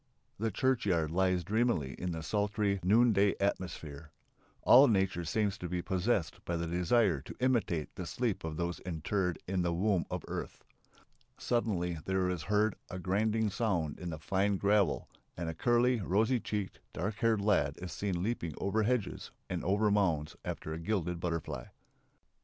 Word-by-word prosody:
The 115 +1 0
churchyard 100 - +1
lies 90 0 +2
dreamily 100 - +1
in 90 0 -2
the 80 -1 -4
sultry 105 0 0
noonday 105 +1 +4
atmosphere. 80 -6 -3 0.5
All 135 +3 +8
nature 95 -5 +1
seems 100 +4 0
to 90 - -5
be 90 0 -2
possessed 95 -2 0
by 85 - -2
the 85 - -2
desire 90 - +2
to - - -10
imitate 115 - 0
the 90 -2 -6
sleep 110 +6 -1
of 80 -1 -4
those 85 +1 -2
interred 90 +1 -2
in 95 0 0
the 85 -1 +1
womb 95 0 +1
of - - -4
earth. - - -6 0.7
Suddenly 90 -8 -1
there 95 -1 +1
is 90 -3 -3
heard 105 +4 +1
a 90 - -5
grinding 105 +4 +1
sound 90 -10 -1
in 90 - -5
the 80 - -4
fine 95 +5 0
gravel 100 -5 +2 0.3
and 85 -1 -3
a - - -3
curly, 120 +6 +2
rosy 110 +6 +2
cheeked, 105 -3 -4
dark 105 +1 -3
haired 115 -2 +2
lad 90 -9 +2
is 90 -1 -6
seen 90 0 -2
leaping 90 -8 -2
over 100 +3 0
hedges 115 -1 -1 0.2
and 90 -2 -2
over 105 +3 +2
mounds 85 -7 +1
after 80 - -4
a 80 - -5
gilded 90 -1 -1
butterfly.... 85 -2 -3
95 Hz, 165 wpm, -32 LUFS, 85-105 Hz, 0.7 s, All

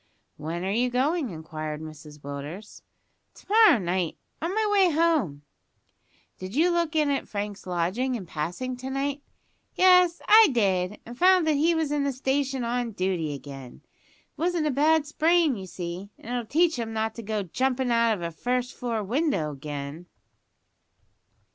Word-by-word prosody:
"When 165 +3 -5
are 195 - -1
you 245 +4 +1
going?" 275 +3 0
inquired 155 -2 -6
Mrs 155 -1 -11
Willders. 145 +9 -8 0.5
"To - - -17
morrow 435 - +6
night, 180 -3 -2 0.2
on 330 +3 -1
my 435 0 +1
way 390 -3 +5
home." 300 - +1 1.0
"Did 185 +4 -7
you 340 +5 +3
look 340 -2 0
in 300 -2 +2
at 275 - -2
Frank's 205 -1 -5
lodging 185 +9 -1
in 205 -6 -6
passing 175 +11 -4
to 260 +1 -6
night?" 275 +1 -2 0.5
"Yes, 360 -2 +5
I 440 0 +8
did, 195 -3 0
and 240 - -9
found 365 +3 +5
that 310 - +3
he 320 +4 +2
was 320 -3 -1
in 295 -1 0
the 280 - 0
station 270 0 -1
on 235 -1 -2
duty 180 -6 -1
again. 135 -3 -10
It - - -36
wasn't 345 -2 +1
a 300 - +1
bad 300 +3 +3
sprain, 320 -1 +2
you 190 -3 -7
see, 175 +2 -6
an' 235 - -9
it'll 240 -2 -3
teach 325 +1 +2
him 225 -1 -4
not 220 0 -1
to 230 - -8
go 215 -1 -2
jumpin' 255 +6 -1
out 230 -1 +3
of 175 - -8
a 170 - -3
first 250 +7 -2
floor 230 -3 -3
window 215 - 0
again." 145 +3 -7
240 Hz, 170 wpm, -26 LUFS, 180-300 Hz, 1.0 s, I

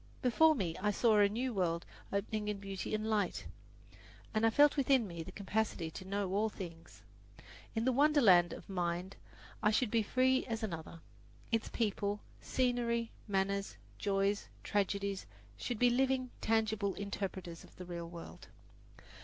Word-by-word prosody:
Before 310 +6 +5
me 175 - -2
I 210 - +2
saw 215 +1 +4
a 205 -1 +6
new 245 +4 -2
world 170 -4 0 0.3
opening 210 +1 -2
in 210 -1 -1
beauty 195 +1 -4
and 215 0 -2
light, 210 -4 0 0.9
and 220 +1 +3
I - - +5
felt 290 +5 +5
within 265 -5 +3
me 170 -2 -6
the 160 - -7
capacity 200 -5 -2
to 185 - -8
know 195 -1 -2
all 215 +2 +2
things. 165 - -9 0.7
In 225 +1 0
the 260 - +4
wonderland 245 - +5
of - - -8
Mind 180 0 -2 0.5
I 210 - +4
should 220 +1 +1
be 230 - +3
as 210 - -2
free 260 +1 +3
as 225 -1 -3
another. 165 -4 -5 0.5
Its 225 -1 0
people, 205 -2 -1 0.2
scenery, 240 -2 0 0.2
manners, 200 0 -1 0.2
joys, 200 0 +1 0.2
tragedies 200 -1 -1 0.3
should 245 - -3
be 245 +2 +4
living, 260 0 +1
tangible 220 -3 +1
interpreters 190 -4 -5
of - - -17
the 180 - -8
real 170 -1 -6
world. 170 -1 -10
205 Hz, 155 wpm, -34 LUFS, 190-230 Hz, 0.9 s, a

